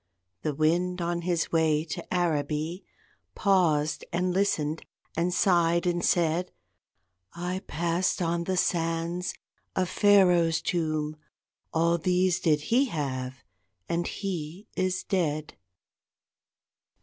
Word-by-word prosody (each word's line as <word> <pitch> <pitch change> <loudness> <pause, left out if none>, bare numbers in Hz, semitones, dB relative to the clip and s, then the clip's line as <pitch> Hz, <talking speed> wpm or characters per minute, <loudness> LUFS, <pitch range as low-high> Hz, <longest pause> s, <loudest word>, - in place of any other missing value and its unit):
The 150 -2 -2
wind 175 +4 +1
on 170 0 -1
his 170 -1 -1
way 160 -2 +2
To 155 - -5
Araby 160 0 -1 0.5
Paused 160 -7 +2
and 180 +1 0
listened 165 -6 0 0.3
and 170 +2 +1
sighed 170 -2 +3
and 175 -1 0
said, 170 +1 +1 0.8
"I 180 +2 -3
passed 170 +3 0
on 170 -1 0
the 185 0 -1
sands 165 +1 0 0.4
A 185 - +2
Pharaoh's 180 -4 +4
tomb: 155 -3 -1 0.5
All 170 +1 +2
these 180 +1 +2
did 150 -3 +2
he 260 +4 +5
have 130 - -4 0.4
and 170 +1 -1
he 185 -1 -5
is 185 0 0
dead." 155 -5 -1
170 Hz, 110 wpm, -27 LUFS, 155-180 Hz, 0.8 s, he